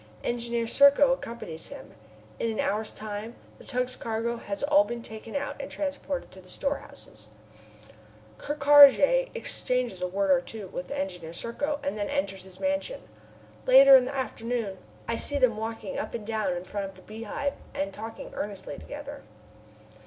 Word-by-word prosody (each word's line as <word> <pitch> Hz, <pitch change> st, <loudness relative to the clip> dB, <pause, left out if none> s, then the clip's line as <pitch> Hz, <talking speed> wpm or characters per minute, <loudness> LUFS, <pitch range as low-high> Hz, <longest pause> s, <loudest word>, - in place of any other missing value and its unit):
Engineer 235 Hz, -1 st, 0 dB
Serko 280 Hz, +2 st, +6 dB
accompanies 230 Hz, -11 st, -6 dB
him. 280 Hz, -, -10 dB, 0.5 s
In 230 Hz, -, 0 dB
an 220 Hz, -, -3 dB
hour's 215 Hz, +2 st, 0 dB
time 215 Hz, +2 st, -6 dB, 0.2 s
the -, -, -13 dB
tug's 250 Hz, -1 st, -2 dB
cargo 230 Hz, +1 st, -2 dB
has 200 Hz, -1 st, -5 dB
all 295 Hz, +1 st, +5 dB
been 240 Hz, -4 st, -6 dB
taken 220 Hz, +2 st, -8 dB
out 285 Hz, 0 st, -2 dB
and 275 Hz, -, -5 dB
transported 285 Hz, -1 st, -4 dB
to 190 Hz, -, -13 dB
the 185 Hz, -, -18 dB
storehouses. 280 Hz, +8 st, -5 dB, 1.1 s
Ker 295 Hz, -, -3 dB
Karraje 295 Hz, -, +7 dB
exchanges 250 Hz, -7 st, -1 dB
a 180 Hz, -, 0 dB
word 195 Hz, +1 st, +1 dB
or 180 Hz, -2 st, +5 dB
two 210 Hz, +3 st, -7 dB
with 180 Hz, -, -6 dB
Engineer 180 Hz, -4 st, -4 dB
Serko 285 Hz, -, -3 dB
and 280 Hz, -7 st, -2 dB
then 205 Hz, -, -2 dB
enters 190 Hz, 0 st, -2 dB
his 190 Hz, -1 st, -11 dB
mansion. 290 Hz, +13 st, -1 dB, 0.7 s
Later, 270 Hz, +1 st, +9 dB
in 255 Hz, -1 st, +6 dB
the 275 Hz, -, -5 dB
afternoon, 230 Hz, -6 st, -3 dB, 0.3 s
I 230 Hz, -, -1 dB
see 285 Hz, -, -1 dB
them 255 Hz, -5 st, +3 dB
walking 220 Hz, -2 st, -4 dB
up -, -, -4 dB
and 220 Hz, -3 st, -5 dB
down 215 Hz, -5 st, -1 dB
in 175 Hz, -, -6 dB
front 200 Hz, +1 st, -4 dB
of 195 Hz, -, -15 dB
the 185 Hz, -, -16 dB
Beehive 225 Hz, +6 st, -4 dB, 0.2 s
and 195 Hz, 0 st, -2 dB
talking 225 Hz, +2 st, -8 dB
earnestly 200 Hz, -2 st, -5 dB
together. 290 Hz, -1 st, -8 dB
230 Hz, 165 wpm, -27 LUFS, 200-280 Hz, 1.1 s, Later